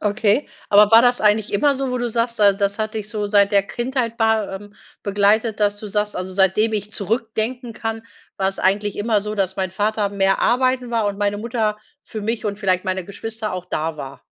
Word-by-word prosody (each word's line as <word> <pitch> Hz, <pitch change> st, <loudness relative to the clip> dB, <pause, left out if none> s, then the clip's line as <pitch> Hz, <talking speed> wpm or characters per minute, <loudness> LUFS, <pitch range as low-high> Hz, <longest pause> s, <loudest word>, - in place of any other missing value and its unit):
Okay. 210 Hz, +5 st, +1 dB, 0.2 s
Aber 210 Hz, 0 st, +6 dB
war 225 Hz, +1 st, +8 dB
das 245 Hz, 0 st, +3 dB
eigentlich 210 Hz, 0 st, +2 dB
immer 280 Hz, +7 st, +3 dB
so, 270 Hz, -1 st, -2 dB
wo 250 Hz, -, -1 dB
du 240 Hz, 0 st, -1 dB
sagst 235 Hz, 0 st, 0 dB
da 200 Hz, -1 st, +6 dB
das 200 Hz, +1 st, -1 dB
hat 215 Hz, 0 st, -3 dB
dich 215 Hz, -1 st, -4 dB
so 215 Hz, -2 st, -3 dB
seit 205 Hz, 0 st, +3 dB
der 200 Hz, -, +5 dB
Kindheit 240 Hz, +2 st, -3 dB
ba 220 Hz, -3 st, +1 dB
ähm, 205 Hz, +1 st, -13 dB, 0.3 s
begleitet, 205 Hz, +2 st, +1 dB
dass 205 Hz, 0 st, +1 dB
du 210 Hz, -, -7 dB
sagst, 210 Hz, +1 st, -2 dB
also: 185 Hz, +1 st, -5 dB
„Seitdem 195 Hz, +4 st, +3 dB
ich 210 Hz, 0 st, -3 dB
zurückdenken 230 Hz, +3 st, -2 dB
kann, 225 Hz, 0 st, -4 dB, 0.3 s
war's 195 Hz, 0 st, -1 dB
eigentlich 200 Hz, +2 st, +1 dB
immer 210 Hz, 0 st, +1 dB
so, 210 Hz, +1 st, -5 dB
dass 190 Hz, -2 st, -1 dB
mein 190 Hz, -1 st, -2 dB
Vater 205 Hz, +2 st, 0 dB
mehr 195 Hz, -1 st, +1 dB
arbeiten 255 Hz, 0 st, +1 dB
war 230 Hz, -3 st, 0 dB
und 200 Hz, -1 st, -3 dB
meine 205 Hz, 0 st, 0 dB
Mutter 220 Hz, -2 st, -1 dB, 0.3 s
für 220 Hz, -, -7 dB
mich 225 Hz, +2 st, -3 dB
und 205 Hz, -1 st, -3 dB
vielleicht 185 Hz, -3 st, 0 dB
meine 185 Hz, -1 st, -2 dB
Geschwister 215 Hz, +2 st, -6 dB
auch 185 Hz, -1 st, -5 dB
da 160 Hz, -2 st, -3 dB
war.“ 140 Hz, -2 st, -8 dB
210 Hz, 215 wpm, -21 LUFS, 200-225 Hz, 0.3 s, war